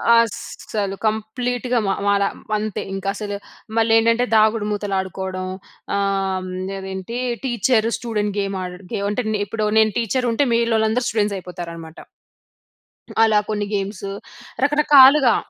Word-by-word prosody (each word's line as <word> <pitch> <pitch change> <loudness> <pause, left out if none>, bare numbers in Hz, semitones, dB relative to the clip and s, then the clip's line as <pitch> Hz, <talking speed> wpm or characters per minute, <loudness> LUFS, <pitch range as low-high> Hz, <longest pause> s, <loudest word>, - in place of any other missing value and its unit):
అసలు 210 -3 -1
కంప్లీట్‌గా 245 +3 -1
మా 195 - +2
మాల 200 0 +3 0.3
అంతే 210 -1 -3
ఇంక 195 0 -5
అసలు, 205 -1 -4 0.4
మళ్ళీ 225 0 +3
ఏంటంటే 230 +2 +3
దాగుడుమూతలు 210 -2 +2
ఆడుకోవడం. 190 0 -4 0.5
ఆహ్, 195 -1 0
హ్మ్, 185 - -6 0.3
అదేంటి 190 +4 -6 0.3
టీచర్ 235 -2 +2
స్టూడెంట్ 210 -4 -2
గేమ్ 195 -1 -2
ఆడడ 180 +1 -7
గే - - -1
అంటే, 210 +4 -1 0.2
ఇప్పుడు 215 +1 -2
నేను 220 0 +4
టీచర్ 245 +2 0
ఉంటే 285 +5 +2
మీలోలందరూ 230 +1 +2
స్టూడెంట్స్ 205 -2 0
అయిపోతారనమాట. 170 -3 -8 1.3
అలా 215 -2 +4
కొన్ని 210 -1 -1
గేమ్స్ 200 -1 -3 0.6
రకరకాలుగా. 285 -2 +6
210 Hz, 120 wpm, -21 LUFS, 195-230 Hz, 1.3 s, రకరకాలుగా